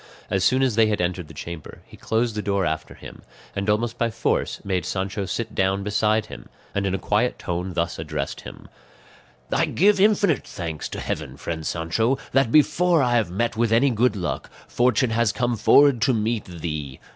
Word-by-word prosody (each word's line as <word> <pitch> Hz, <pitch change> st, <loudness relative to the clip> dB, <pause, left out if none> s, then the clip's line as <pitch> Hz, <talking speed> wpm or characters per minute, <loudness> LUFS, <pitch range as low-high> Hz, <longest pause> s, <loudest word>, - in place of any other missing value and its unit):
As 95 Hz, -2 st, +1 dB
soon 130 Hz, +6 st, +3 dB
as 130 Hz, -3 st, +2 dB
they 110 Hz, 0 st, +4 dB
had 105 Hz, -1 st, 0 dB
entered 90 Hz, -1 st, -2 dB
the 80 Hz, -, -12 dB
chamber 85 Hz, +1 st, -8 dB
he -, -, -15 dB
closed 115 Hz, +1 st, -1 dB
the 105 Hz, -, -3 dB
door 100 Hz, -1 st, 0 dB
after 80 Hz, -1 st, -3 dB
him, -, -, -11 dB, 0.3 s
and 100 Hz, +1 st, -2 dB
almost 115 Hz, +3 st, 0 dB
by 115 Hz, -, +2 dB
force 110 Hz, -, -1 dB
made 95 Hz, -3 st, 0 dB
Sancho 95 Hz, +2 st, -3 dB
sit 115 Hz, +3 st, -3 dB
down 95 Hz, +1 st, +1 dB
beside 105 Hz, +1 st, +1 dB
him, -, -, -11 dB, 0.2 s
and 100 Hz, -1 st, 0 dB
in 95 Hz, -, 0 dB
a -, -, -1 dB
quiet 105 Hz, +6 st, 0 dB
tone 90 Hz, +1 st, -4 dB
thus 85 Hz, -1 st, -1 dB
addressed 75 Hz, -3 st, -4 dB
him: -, -, -11 dB, 0.9 s
"I -, -, +3 dB
give 200 Hz, +2 st, +3 dB
infinite 205 Hz, -1 st, +3 dB
thanks 80 Hz, -4 st, -5 dB
to -, -, -6 dB
heaven, 70 Hz, -4 st, -4 dB
friend 80 Hz, +1 st, -5 dB
Sancho, 85 Hz, -, 0 dB
that, 135 Hz, -4 st, +2 dB
before 165 Hz, +2 st, +4 dB
I 120 Hz, -1 st, +1 dB
have 110 Hz, -6 st, +2 dB
met 110 Hz, +6 st, -1 dB
with 115 Hz, 0 st, +1 dB
any 125 Hz, +4 st, +4 dB
good 120 Hz, 0 st, +2 dB
luck, 90 Hz, -4 st, -3 dB, 0.2 s
fortune 120 Hz, 0 st, +2 dB
has 115 Hz, -1 st, +2 dB
come 120 Hz, +2 st, -1 dB
forward 135 Hz, +3 st, +5 dB
to 130 Hz, -3 st, +3 dB
meet 110 Hz, 0 st, -1 dB
thee. 75 Hz, -6 st, -5 dB
105 Hz, 195 wpm, -23 LUFS, 90-120 Hz, 0.9 s, forward